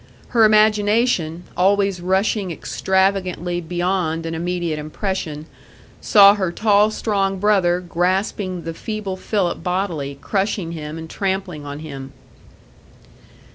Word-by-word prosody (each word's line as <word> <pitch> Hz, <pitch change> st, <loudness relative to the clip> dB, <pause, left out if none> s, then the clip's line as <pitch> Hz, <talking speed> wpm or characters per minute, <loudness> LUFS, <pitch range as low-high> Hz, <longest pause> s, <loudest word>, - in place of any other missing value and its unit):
Her 230 Hz, -2 st, +5 dB
imagination, 210 Hz, -5 st, +2 dB
always 195 Hz, 0 st, +2 dB
rushing 190 Hz, +2 st, 0 dB
extravagantly 185 Hz, 0 st, -1 dB
beyond 175 Hz, -1 st, -1 dB
an 165 Hz, -, -3 dB
immediate 170 Hz, -1 st, -2 dB
impression, 155 Hz, -1 st, -4 dB, 0.6 s
saw 200 Hz, -1 st, +7 dB
her 190 Hz, -4 st, -1 dB
tall, 210 Hz, +2 st, +3 dB
strong 195 Hz, -3 st, -1 dB
brother 185 Hz, -3 st, +2 dB
grasping 180 Hz, +1 st, -1 dB
the 165 Hz, +1 st, -5 dB
feeble 210 Hz, +1 st, -4 dB
Philip 185 Hz, -2 st, -1 dB
bodily, 175 Hz, -7 st, -2 dB
crushing 195 Hz, -1 st, -1 dB
him 155 Hz, -1 st, -6 dB
and 160 Hz, 0 st, -7 dB
trampling 190 Hz, -5 st, -3 dB
on 145 Hz, +1 st, -6 dB
him. 140 Hz, -3 st, -8 dB
185 Hz, 110 wpm, -20 LUFS, 165-200 Hz, 0.6 s, saw